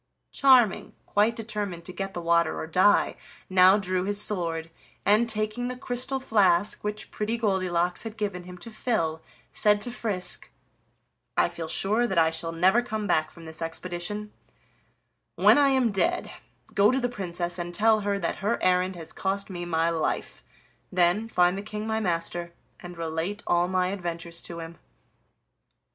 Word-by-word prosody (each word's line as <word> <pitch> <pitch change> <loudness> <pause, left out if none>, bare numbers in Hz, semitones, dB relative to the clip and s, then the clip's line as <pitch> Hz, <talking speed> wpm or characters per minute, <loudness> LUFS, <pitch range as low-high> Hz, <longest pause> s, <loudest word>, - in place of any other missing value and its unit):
Charming, 255 -7 +4
quite 215 +3 +2
determined 205 -6 -4
to 185 - -7
get 195 0 -5
the 175 - -4
water 170 -1 +2
or - - -4
die, 185 +5 +3 0.4
now 185 +1 +6
drew 185 -2 -1
his 205 +1 +3
sword, 165 -6 +1 0.3
and, 215 +4 +3
taking 215 +2 -1
the 250 0 -5
crystal 250 +2 -3
flask 205 -6 +2
which 210 0 -4
Pretty 215 +2 -2
Goldilocks 185 -5 0
had 225 -1 -6
given 200 -4 -3
him 180 0 -10
to 230 +5 -10
fill, 165 -9 -1 0.3
said 210 -1 +3
to 245 - -3
Frisk: 210 -6 -4 0.9
"I - - +4
feel 165 -1 -6
sure 215 +8 +1
that 190 -6 -3
I 160 -1 +4
shall 165 0 -3
never 185 +8 +3
come 220 -3 -4
back 155 -5 +1
from 165 +1 -14
this 160 +1 -10
expedition; 175 +5 -4 1.0
when - - +6
I 280 -1 +5
am 260 -4 +2
dead, 340 - 0 0.4
go 200 +1 +5
to 260 - +2
the 245 - 0
Princess 180 -6 -3
and 175 0 -4
tell 220 +2 +4
her 200 -1 -1
that - - -2
her 210 +4 0
errand 185 +1 +2
has 165 -2 -8
cost 195 +1 -2
me 175 -1 -5
my 165 0 +1
life. 160 -1 -2 0.5
Then 180 +4 +2
find 180 -4 +3
the 195 - -4
King 210 +1 -6
my 220 0 -1
master, 170 -2 -2 0.3
and 175 -1 -10
relate 165 +5 -3
all 175 0 +2
my 185 0 0
adventures 170 -3 -3
to 170 -1 -6
him." 165 0 -10
190 Hz, 170 wpm, -26 LUFS, 175-215 Hz, 1.0 s, now